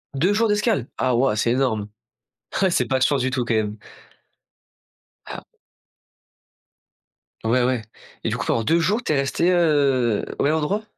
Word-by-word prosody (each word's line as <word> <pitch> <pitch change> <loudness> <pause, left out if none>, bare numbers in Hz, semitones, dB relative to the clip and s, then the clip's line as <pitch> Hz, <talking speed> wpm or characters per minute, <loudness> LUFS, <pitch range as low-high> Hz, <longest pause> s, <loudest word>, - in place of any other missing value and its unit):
2 180 +9 +2
jours 225 +2 +2
d'escale! 210 - +1
Ah 130 -2 +1
waouh, 125 -2 +2
c'est 115 +2 +1
énorme. 115 -5 0 0.8
Eh! 190 - +4
C'est 130 -8 +1
pas 130 +2 0
de 130 - +2
chance 140 -1 +2
du 130 - 0
tout, 125 -2 -1
quand 115 - -1
même. 105 -1 -1 1.5
Ah. - - -8 2.0
Ouais, 120 +3 +2
ouais. 125 -2 0 0.4
Et - - -1
du - - -2
coup, - - -4
pendant 115 - 0
2 165 +8 +2
jours, 210 +8 +1
tu - - 0
es - - +1
resté, 140 +5 +1
heu, 140 - +2
au - - 0
même 150 +2 +2
endroit? 160 +8 -1
135 Hz, 175 wpm, -22 LUFS, 120-165 Hz, 2.0 s, Eh